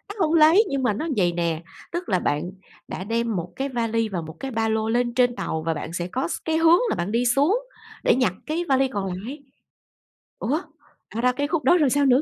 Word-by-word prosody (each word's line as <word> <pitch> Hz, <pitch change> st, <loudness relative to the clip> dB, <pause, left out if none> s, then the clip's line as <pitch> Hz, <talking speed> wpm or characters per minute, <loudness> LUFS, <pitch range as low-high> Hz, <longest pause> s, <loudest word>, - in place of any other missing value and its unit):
Nó 385 Hz, -6 st, +1 dB
hông 310 Hz, -, 0 dB
lấy 330 Hz, +6 st, +6 dB
nhưng 275 Hz, -1 st, -1 dB
mà 240 Hz, -4 st, +2 dB
nó 310 Hz, +11 st, -3 dB
vầy 180 Hz, -3 st, +3 dB
nè, 170 Hz, -1 st, -1 dB, 0.3 s
tức 345 Hz, +1 st, -4 dB
là 185 Hz, -3 st, +2 dB
bạn 150 Hz, +4 st, -1 dB, 0.4 s
đã -, -, -5 dB
đem 230 Hz, +1 st, -1 dB
1 175 Hz, -1 st, -3 dB
cái 275 Hz, +1 st, -2 dB
vali 230 Hz, -3 st, -1 dB
và 180 Hz, -4 st, -3 dB
1 160 Hz, 0 st, -9 dB
cái 270 Hz, -, -5 dB
ba 225 Hz, -1 st, 0 dB
lô 220 Hz, 0 st, 0 dB
lên 240 Hz, +1 st, +1 dB
trên 245 Hz, -1 st, +2 dB
tàu 160 Hz, -9 st, -3 dB
và 165 Hz, -, +1 dB
bạn 155 Hz, +1 st, -6 dB
sẽ 175 Hz, 0 st, -2 dB
có 170 Hz, -, -2 dB
s -, -, -3 dB
cái 320 Hz, 0 st, +1 dB
hướng 330 Hz, +1 st, +6 dB
là -, -, 0 dB
bạn 175 Hz, +4 st, -3 dB
đi 235 Hz, +2 st, +1 dB
xuống 285 Hz, -, +3 dB, 0.4 s
để -, -, +4 dB
nhặt 250 Hz, -8 st, +2 dB
cái 330 Hz, +3 st, -2 dB
vali 270 Hz, 0 st, +3 dB
còn 205 Hz, -7 st, -3 dB
lại. 250 Hz, +11 st, -7 dB, 1.0 s
Ủa, 295 Hz, +8 st, 0 dB, 0.5 s
ra 230 Hz, -, -1 dB
đó 250 Hz, +1 st, +4 dB
cái 285 Hz, +3 st, -2 dB
khúc 320 Hz, 0 st, -1 dB
đó 355 Hz, -, +5 dB
rồi 300 Hz, -5 st, +3 dB
sao 285 Hz, +2 st, +2 dB
nữa? 260 Hz, +1 st, +5 dB
245 Hz, 245 wpm, -24 LUFS, 195-285 Hz, 1.0 s, lấy